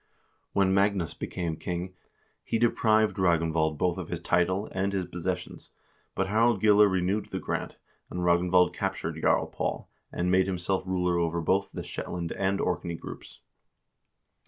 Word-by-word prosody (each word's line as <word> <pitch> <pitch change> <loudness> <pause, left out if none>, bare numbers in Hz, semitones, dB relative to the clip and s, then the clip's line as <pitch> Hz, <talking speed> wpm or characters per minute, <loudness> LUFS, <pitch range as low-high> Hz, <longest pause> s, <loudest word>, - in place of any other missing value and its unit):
When 95 -1 +3
Magnus 100 -4 +1
became 85 -3 -4
king, 90 +2 -4 0.5
he - - -1
deprived 110 -2 +2
Ragnvald 80 -3 +2
both 90 +3 0
of 90 - -6
his 85 - -3
title 90 +4 +1
and 95 +1 -1
his 95 -2 -1
posses 90 +1 -2
sions, - - -11 0.5
but 95 - +1
Harald 110 +2 +2
Gille 105 0 +6
renewed 95 +2 0
the - - -4
grant, - - -4 0.3
and 90 - -4
Ragnvald 90 +1 +3
captured - - -3
Jarl - - +3
Paul, - - -4 0.2
and 90 +1 -1
made 95 0 +4
himself 95 0 -1
ruler 90 -2 +1
over 85 0 0
both 95 +4 +1
the - - -6
Shetland 85 -2 -5
and 95 0 0
Orkney 85 -2 -1
groups. - - -10
90 Hz, 155 wpm, -28 LUFS, 85-100 Hz, 0.5 s, Gille